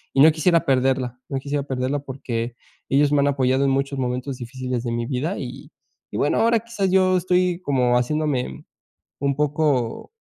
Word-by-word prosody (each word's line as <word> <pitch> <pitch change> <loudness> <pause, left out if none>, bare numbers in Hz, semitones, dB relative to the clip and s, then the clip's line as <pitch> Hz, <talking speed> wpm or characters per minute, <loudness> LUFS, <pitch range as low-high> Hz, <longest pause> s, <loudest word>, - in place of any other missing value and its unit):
y 135 - +3
no 155 - +9
quisiera 165 +1 +2
perderla. 130 -2 +1
No 135 - -2
quisiera 140 +1 -2
perderla 135 +1 -2
porque 125 -4 -4 0.3
ellos 145 +1 +3
me 145 - +4
han 140 - +2
apoyado 135 -1 +2
en 135 - +3
muchos 140 +1 -1
momentos 125 +1 -2
difíciles 125 0 -4
de 120 - -2
mi 115 0 -2
vida, 145 +8 -2
y 135 +4 -8 0.4
y - - -4
bueno, 145 - +1
ahora 230 0 +4
quizás 210 -4 -2
yo 185 -1 +4
estoy 180 0 +1
como 125 -5 +2
haciéndome 130 - -1 0.5
un 140 -1 0
poco, 145 - 0
135 Hz, 175 wpm, -23 LUFS, 125-150 Hz, 0.5 s, no